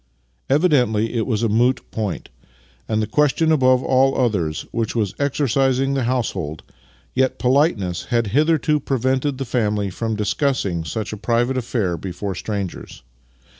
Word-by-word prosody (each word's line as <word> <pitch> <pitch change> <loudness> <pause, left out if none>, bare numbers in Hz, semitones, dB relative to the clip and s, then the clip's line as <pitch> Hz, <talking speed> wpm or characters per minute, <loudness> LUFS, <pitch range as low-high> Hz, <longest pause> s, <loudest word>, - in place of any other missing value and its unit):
Evidently 125 -8 +2
it 115 -2 -1
was 115 -3 0
a - - +3
moot 120 +4 +2
point, 105 -5 -4 0.6
and 110 0 +1
the - - 0
question 150 +5 +2
above 130 -4 +4
all 135 +1 +3
others 95 -11 0
which 115 -1 -2
was 105 -5 0
exercising 135 -1 +1
the 135 -3 0
household, 95 - -2 0.5
yet 130 0 +1
politeness 125 - +1
had 120 -1 +1
hitherto 150 +5 +2
prevented 130 +1 0
the 135 - -3
family 105 -5 0
from 110 +3 -3
discussing 105 - 0
such 100 +7 -4
a - - -5
private 120 +4 0
affair 115 -8 -1
before 95 +3 -5
strangers. 100 0 -5
120 Hz, 140 wpm, -21 LUFS, 105-135 Hz, 0.6 s, above